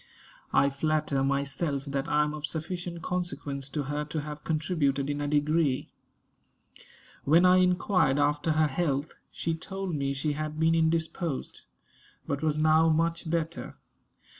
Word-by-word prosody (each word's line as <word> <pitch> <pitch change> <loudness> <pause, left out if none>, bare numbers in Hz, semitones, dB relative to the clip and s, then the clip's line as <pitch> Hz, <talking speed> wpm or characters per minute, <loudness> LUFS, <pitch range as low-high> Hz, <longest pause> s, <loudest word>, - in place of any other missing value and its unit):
I 140 0 +4
flatter 150 -1 0
myself 140 +1 -1
that 140 -1 -2
I 150 0 +3
am 150 0 -2
of 150 0 -4
sufficient 170 +1 -5
consequence 145 -6 -3
to 145 0 -2
her 145 +2 -2
to 150 +1 -3
have 150 0 -7
contributed 150 -4 0
in 145 0 -3
a 145 - -1
degree. 150 -1 +1 1.3
When 165 +5 +5
I 180 0 +6
inquired 180 -5 +3
after 145 +2 +1
her 155 0 +3
health, 145 0 -1 0.2
she 165 - -2
told 190 +3 -5
me 140 -2 -1
she 145 +2 -1
had 155 +1 -4
been 160 +1 +4
indisposed; 165 -1 -1 0.6
but 140 0 -2
was 155 -1 +1
now 155 +1 +4
much 165 +1 0
better. 165 +1 -3
155 Hz, 145 wpm, -28 LUFS, 145-165 Hz, 1.3 s, I